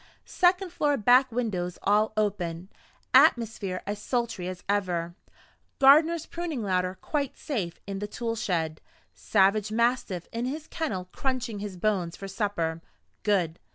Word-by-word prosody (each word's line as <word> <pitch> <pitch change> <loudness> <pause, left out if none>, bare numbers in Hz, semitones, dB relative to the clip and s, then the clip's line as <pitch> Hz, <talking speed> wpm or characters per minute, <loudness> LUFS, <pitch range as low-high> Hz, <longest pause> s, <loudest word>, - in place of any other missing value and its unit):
Second 365 0 +2
floor 295 -4 +1
back 250 +3 +5
windows 190 -7 -2
all 210 +2 +3
open, 180 -4 -1 0.4
atmosphere 215 -5 +3
as 205 +1 -4
sultry 235 -7 -2
as 185 -1 -6
ever, 180 -4 0 0.6
gardener's 315 +4 +5
pruning 335 -8 -4
ladder 185 -1 0
quite 285 -3 -2
safe 195 - -3
in 195 -1 -4
the 205 - -3
tool 230 +2 -3
shed, 165 -8 -2 0.3
savage 205 +1 +2
mastiff 230 -6 0
in 230 +1 -2
his 295 +4 -4
kennel 195 - -3
crunching 255 -5 -2
his 200 -2 -6
bones 180 -3 0
for 195 - -7
supper. 190 -6 -2 0.4
Good. 180 -6 +1
210 Hz, 135 wpm, -27 LUFS, 185-250 Hz, 0.6 s, back